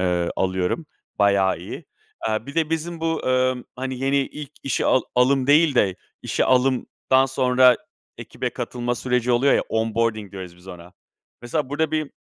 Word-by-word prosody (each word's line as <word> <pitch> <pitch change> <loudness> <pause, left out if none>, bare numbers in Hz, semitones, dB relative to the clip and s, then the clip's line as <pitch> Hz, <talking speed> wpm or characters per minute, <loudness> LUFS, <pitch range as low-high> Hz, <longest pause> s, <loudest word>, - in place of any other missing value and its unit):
ııı, 90 -2 0
alıyorum. 95 - -1 0.3
Bayağı 100 -2 +3
iyi. - - -8 0.4
Eee, 110 +2 -2
bir 140 - -8
de 160 -1 0
bizim 165 +1 -3
bu, 165 0 -1
ımm, 130 -1 +1
hani, 130 0 -4
yeni 135 +1 +1
ilk 145 +1 -4
işi 135 -3 -1
al 130 - +3
alım 130 +1 +3
değil 150 0 +5
de 95 -6 +3 0.3
işi - - 0
alımdan 130 +1 +2
sonra 125 -1 +4 0.4
ekibe - - -4
katılma 120 0 -3
süreci 125 0 0
oluyor 130 +4 +4
ya - - +2
onboarding 110 -2 -1
diyoruz 90 -3 -8
biz 90 +2 -17
ona. 90 0 -11 0.5
Mesela 130 +3 -2
burada 155 +2 -1
bir 155 -2 -2
125 Hz, 160 wpm, -23 LUFS, 110-140 Hz, 0.5 s, değil